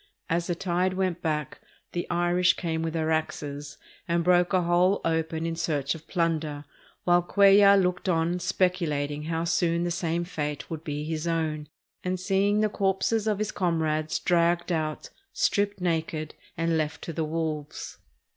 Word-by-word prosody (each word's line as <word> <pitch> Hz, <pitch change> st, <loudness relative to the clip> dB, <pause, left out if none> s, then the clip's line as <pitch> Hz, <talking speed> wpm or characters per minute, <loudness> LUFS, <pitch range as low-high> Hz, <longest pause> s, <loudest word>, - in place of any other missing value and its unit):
As 170 Hz, +1 st, +1 dB
the 175 Hz, -, -1 dB
tide 180 Hz, +1 st, 0 dB
went 185 Hz, -2 st, -1 dB
back, 155 Hz, -3 st, -2 dB, 0.3 s
the 175 Hz, -, -4 dB
Irish 175 Hz, +1 st, +3 dB
came 160 Hz, -2 st, -2 dB
with 165 Hz, -1 st, -2 dB
their 160 Hz, -1 st, 0 dB
axes 145 Hz, -2 st, -3 dB, 0.3 s
and 170 Hz, 0 st, +1 dB
broke 180 Hz, 0 st, +4 dB
a 185 Hz, -2 st, +3 dB
hole 175 Hz, +3 st, +3 dB
open 160 Hz, 0 st, -1 dB
in 165 Hz, 0 st, -2 dB
search 145 Hz, -4 st, -1 dB
of 160 Hz, 0 st, -11 dB
plunder; 160 Hz, -4 st, -1 dB, 0.4 s
while 175 Hz, 0 st, +4 dB
Cuellar 200 Hz, +2 st, +6 dB
looked 180 Hz, 0 st, 0 dB
on 170 Hz, +1 st, +1 dB
speculating 165 Hz, -6 st, 0 dB
how 165 Hz, 0 st, -1 dB
soon 170 Hz, 0 st, +1 dB
the 175 Hz, -, -1 dB
same 170 Hz, -1 st, -1 dB
fate 150 Hz, -5 st, -4 dB
would 160 Hz, -1 st, -5 dB
be 150 Hz, -2 st, -3 dB
his 160 Hz, +1 st, -3 dB
own, 155 Hz, -3 st, -1 dB, 0.3 s
and 185 Hz, 0 st, -1 dB
seeing 195 Hz, +3 st, +2 dB
the 215 Hz, -, +3 dB
corpses 200 Hz, +3 st, 0 dB
of 210 Hz, -2 st, +1 dB
his 215 Hz, +1 st, -2 dB
comrades 160 Hz, -4 st, 0 dB
dragged 175 Hz, 0 st, +2 dB
out, 155 Hz, -2 st, -2 dB, 0.2 s
stripped 205 Hz, 0 st, +1 dB
naked, 160 Hz, -3 st, -2 dB, 0.2 s
and 165 Hz, 0 st, +1 dB
left 155 Hz, +1 st, -3 dB
to 165 Hz, -, -5 dB
the 160 Hz, -, -1 dB
wolves. 155 Hz, -2 st, -4 dB
170 Hz, 165 wpm, -27 LUFS, 160-180 Hz, 0.4 s, Cuellar